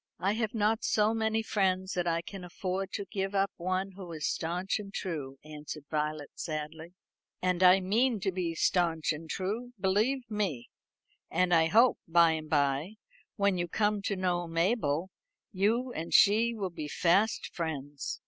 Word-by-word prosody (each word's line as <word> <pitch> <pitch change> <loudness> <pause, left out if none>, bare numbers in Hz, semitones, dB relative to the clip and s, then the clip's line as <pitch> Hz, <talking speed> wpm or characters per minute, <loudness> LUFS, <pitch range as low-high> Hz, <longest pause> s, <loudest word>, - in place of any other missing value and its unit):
"I 190 +3 +1
have 220 0 -2
not 220 +1 +1
so 215 +1 +2
many 220 0 0
friends 190 -3 0
that 180 -1 -1
I 170 0 0
can 195 +1 -8
afford 185 +2 -3
to 200 - -3
give 195 0 -3
up 195 0 +2
one 185 +2 -2
who 185 -2 -9
is 155 -1 -4
stanch 180 +5 -1
and 200 -1 -8
true," 150 -9 -4
answered 150 0 -8
Violet 150 -1 -2
sadly. 160 +2 -6 0.4
"And 180 -1 0
I 185 +1 +7
mean 225 +5 +2
to 195 -1 0
be 175 -3 -2
stanch 165 -2 +1
and 160 +2 -9
true, 220 +6 -3
believe 215 +8 +1
me; 200 - -3 0.6
and 180 +1 +2
I 160 -1 +5
hope, 230 +8 +4
by 165 0 +5
and 155 -1 -4
by, 145 +6 +1 0.4
when 200 -3 +1
you 175 - -1
come 210 +3 0
to 200 - 0
know 180 -2 -1
Mabel, 165 -1 0 0.4
you 230 +6 +1
and 165 +2 -5
she 225 +3 +5
will 195 -4 -3
be 155 -3 -6
fast 185 +8 +1
friends. 145 -4 -4
185 Hz, 165 wpm, -30 LUFS, 165-205 Hz, 0.6 s, I